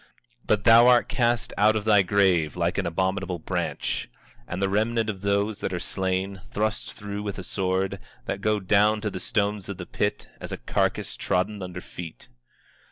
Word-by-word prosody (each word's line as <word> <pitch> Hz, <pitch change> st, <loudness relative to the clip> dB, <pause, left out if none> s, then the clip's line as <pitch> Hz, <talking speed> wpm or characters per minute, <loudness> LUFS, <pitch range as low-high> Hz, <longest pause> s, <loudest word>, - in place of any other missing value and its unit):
24:19 -, -, -27 dB
But 105 Hz, -2 st, +2 dB
thou 115 Hz, +1 st, +8 dB
art 125 Hz, -1 st, +5 dB
cast 120 Hz, -5 st, 0 dB
out 105 Hz, +1 st, +5 dB
of 110 Hz, -1 st, -2 dB
thy 105 Hz, -2 st, +6 dB
grave 90 Hz, -6 st, +2 dB
like -, -, 0 dB
an -, -, -1 dB
abominable 95 Hz, +1 st, -1 dB
branch, 80 Hz, -, -3 dB, 0.4 s
and 90 Hz, -, -4 dB
the 95 Hz, -, +2 dB
remnant 110 Hz, +2 st, +1 dB
of 95 Hz, -3 st, -11 dB
those 100 Hz, +1 st, 0 dB
that 95 Hz, -, -3 dB
are 90 Hz, -, -1 dB
slain, 95 Hz, +1 st, -2 dB
thrust 110 Hz, +2 st, -2 dB
through 100 Hz, 0 st, -6 dB
with 100 Hz, -1 st, -4 dB
a 95 Hz, -, -5 dB
sword, 95 Hz, +1 st, -1 dB, 0.3 s
that 100 Hz, -, -3 dB
go 105 Hz, 0 st, +1 dB
down 105 Hz, +3 st, +3 dB
to 105 Hz, -1 st, -2 dB
the 95 Hz, -, -5 dB
stones 100 Hz, -1 st, -1 dB
of 100 Hz, -, -5 dB
the 90 Hz, -, -6 dB
pit; 105 Hz, -, -2 dB
as -, -, -6 dB
a -, -, -3 dB
carcass -, -, -1 dB
trodden 100 Hz, +3 st, -1 dB
under 90 Hz, -1 st, -6 dB
feet. 85 Hz, -8 st, -9 dB
100 Hz, 190 wpm, -25 LUFS, 95-105 Hz, 0.4 s, thou